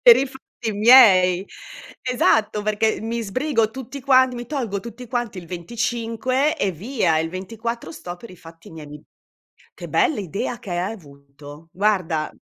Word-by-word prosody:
per - - +9
i 270 - +1
fatti 255 -4 -7
miei. 200 -5 +6 0.6
Esatto, 220 -4 +1
perché 215 +1 0
mi 230 +1 -3
sbrigo 230 +1 0
tutti 265 +3 -8
quanti, 260 -1 +4
mi 240 -1 -6
tolgo 235 -9 -3
tutti 235 +3 -10
quanti 240 -4 -3
il 175 -2 -8
25 235 - -1
e 200 - 0
via, 185 - 0
e 160 - +1
il - - -3
24 220 +2 -5
sto 175 +2 -8
per 235 - -13
i 180 - -13
fatti 165 0 -14
miei. 150 -2 -10 0.7
Che - - -9
bell'idea 210 - -1
che 205 - -11
hai 175 +4 -2
avuto! 145 -2 -13
Guarda 180 -5 0
215 Hz, 155 wpm, -22 LUFS, 175-245 Hz, 0.7 s, per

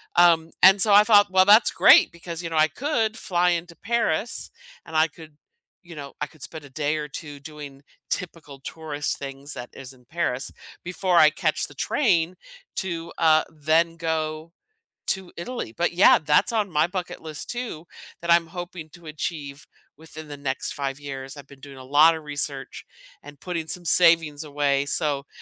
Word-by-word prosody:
Um, 165 -2 +4
and 190 +1 +7
so 210 -1 +4
I 205 +1 +8
thought, 205 -3 +5
"Well, 185 0 +5
that's 210 +3 +6
great," - - +6
because, 170 0 -8
you 165 - -4
know, 165 - -5
I 155 0 +5
could 230 -6 -1
fly 180 -1 +1
into 170 0 -3
Paris, 225 -2 -2 0.3
and 160 - -10
I 160 +1 +4
could, 155 -1 -15 0.5
you 170 -2 -12
know, 140 -1 -9
I - - -1
could 155 -2 -15
spend 155 -1 -8
a - - -13
day 150 +2 -2
or 150 -1 -4
2 145 0 -9
doing 145 -2 -11 0.3
typical 160 -6 -5
tourist 150 0 -4
things 140 +1 -8
that 120 - -8
is 135 -1 -10
in 125 -1 -23
Paris 150 -4 -3 0.3
before 180 0 0
I 155 0 +7
catch 155 -1 -1
the 145 - -16
train 180 - 0 0.4
to, 170 -3 -4
uh 160 -1 +4
then 160 +2 +1
go 160 0 -3 0.6
to 190 -2 -2
Italy. 205 - -5
But 175 +4 -1
yeah, 180 +3 +6
that's 150 +8 +2
on 210 -4 0
my 155 +1 +2
bucket 180 -1 -6
list 155 -2 -8
too, 235 -10 -6 0.4
that 170 - -2
I'm 170 -1 +4
hoping 175 -2 -8
to 170 -1 -16
achieve 150 -2 -6 0.3
within 155 0 -12
the 145 - -7
next 135 -2 -4
5 140 -1 -4
years. 135 -1 -7
I've 140 -1 -11
been 140 - -15
doing 140 -1 -12
a - - -10
lotta 155 +4 +4
research 145 -2 -4 0.4
and 145 -1 -14
putting 165 0 -5
some 180 -1 -5
savings 165 -4 +4
away 140 -1 0
so, 145 -2 -1
160 Hz, 180 wpm, -24 LUFS, 145-175 Hz, 0.6 s, I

